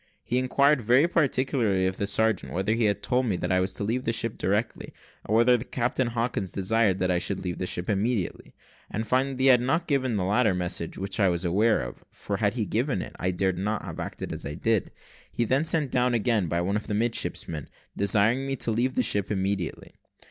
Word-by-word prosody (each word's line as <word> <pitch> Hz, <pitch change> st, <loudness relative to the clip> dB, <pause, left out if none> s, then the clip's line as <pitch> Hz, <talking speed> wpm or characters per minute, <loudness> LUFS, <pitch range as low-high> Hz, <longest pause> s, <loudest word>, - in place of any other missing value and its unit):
He 125 Hz, -, 0 dB
inquired 140 Hz, +2 st, +3 dB
very 125 Hz, +8 st, +4 dB
particularly 130 Hz, -, +1 dB
of 95 Hz, 0 st, -1 dB
the 100 Hz, -, -1 dB
sergeant 110 Hz, 0 st, 0 dB
whether 95 Hz, +4 st, 0 dB
he 115 Hz, 0 st, +1 dB
had 100 Hz, -1 st, 0 dB
told 125 Hz, 0 st, +1 dB
me 100 Hz, -, +1 dB
that 90 Hz, +1 st, -2 dB
I 95 Hz, -, +3 dB
was 95 Hz, +1 st, 0 dB
to 100 Hz, -, -4 dB
leave 120 Hz, +5 st, -1 dB
the 115 Hz, -, 0 dB
ship 115 Hz, -1 st, -1 dB
directly, 105 Hz, +4 st, -2 dB, 0.3 s
or 110 Hz, -, +1 dB
whether 120 Hz, +2 st, +5 dB
that 120 Hz, -, -9 dB
Captain 125 Hz, +1 st, 0 dB
Hawkins 115 Hz, -4 st, -2 dB
desired 100 Hz, +1 st, +1 dB
that 90 Hz, -1 st, 0 dB
I 90 Hz, -, +2 dB
should 95 Hz, +2 st, -1 dB
leave 90 Hz, -2 st, -4 dB
the 90 Hz, -, -2 dB
ship 90 Hz, 0 st, -1 dB
immediately; 105 Hz, -1 st, -2 dB, 0.3 s
and 110 Hz, +2 st, -3 dB
finding 130 Hz, +4 st, +1 dB
that 130 Hz, -, -2 dB
he 135 Hz, -, +6 dB
had 125 Hz, -2 st, +6 dB
not 160 Hz, +8 st, 0 dB
given 130 Hz, -7 st, 0 dB
the 95 Hz, -, 0 dB
latter 105 Hz, 0 st, +2 dB
message 85 Hz, -2 st, -3 dB
(which 95 Hz, +3 st, -3 dB
I 100 Hz, -2 st, +4 dB
was 85 Hz, +1 st, -2 dB
aware 105 Hz, +6 st, +2 dB
of, -, -, -8 dB
for -, -, -5 dB
had -, -, 0 dB
he -, -, -1 dB
given -, -, -1 dB
it, -, -, -10 dB
I 90 Hz, -, 0 dB
dare 95 Hz, +1 st, 0 dB
not 105 Hz, +4 st, -3 dB
have -, -, -7 dB
acted -, -, -5 dB
as -, -, -5 dB
I 75 Hz, +1 st, -5 dB
did), 115 Hz, -3 st, 0 dB, 0.4 s
he -, -, -1 dB
then 130 Hz, +6 st, +2 dB
sent 155 Hz, -5 st, +1 dB
down 125 Hz, -1 st, +2 dB
again 110 Hz, -4 st, +1 dB
by 85 Hz, +2 st, 0 dB
one 100 Hz, +4 st, 0 dB
of 105 Hz, -, -6 dB
the 105 Hz, -, -2 dB
midshipmen, 105 Hz, -, -1 dB, 0.3 s
desiring 110 Hz, +6 st, +2 dB
me 135 Hz, -, -1 dB
to 120 Hz, -, -1 dB
leave 125 Hz, +4 st, 0 dB
the -, -, +2 dB
ship 100 Hz, -1 st, +1 dB
immediately. 95 Hz, -3 st, -3 dB
110 Hz, 230 wpm, -26 LUFS, 95-125 Hz, 0.4 s, he